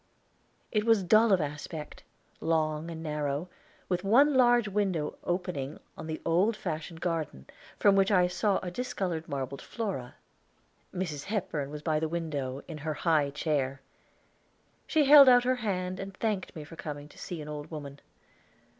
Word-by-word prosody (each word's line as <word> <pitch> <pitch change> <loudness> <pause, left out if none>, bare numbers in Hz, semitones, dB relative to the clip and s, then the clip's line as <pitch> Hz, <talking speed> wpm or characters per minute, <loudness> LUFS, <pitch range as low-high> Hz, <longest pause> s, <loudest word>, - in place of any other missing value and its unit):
It 210 -1 +1
was 225 -3 +4
dull 215 +5 +5
of 190 - +5
aspect, 150 +1 -5 0.4
long 160 0 0
and 165 -1 -6
narrow, 150 +1 -2 0.4
with 180 0 -1
one 270 +9 +5
large 240 -3 +5
window 195 -7 -1
opening 175 -6 -3 0.2
on - - -8
the 160 0 -4
old 190 +7 +2
fashioned 165 -2 -5
garden, 160 - -2
and - - -17 0.3
from 200 -1 +5
which 195 0 +4
I 180 -4 +5
saw 190 +3 +1
a 180 - -4
discolored 180 -8 -3
marble 140 -1 -4
Flora. 195 - -5 0.8
Mrs. 160 -6 -4
Hepburn 170 -9 -2
was 150 0 -7
by 155 -2 +1
the 160 0 -1
window, 145 -5 -3
in 160 -3 -7
her 155 0 -3
high 155 -4 +2
chair. 140 -2 -1 1.1
She 310 -2 +3
held 280 -1 +10
out 245 -1 +6
her 255 +1 +1
hand 185 -5 -2
and 195 0 -7
thanked 210 -6 -2
me 155 - -6
for 160 +3 -11
coming 145 -2 -6
to - - -17
see 175 - -6
an 150 - -7
old 150 0 -6
woman. 145 -3 -7
165 Hz, 165 wpm, -29 LUFS, 150-200 Hz, 1.1 s, held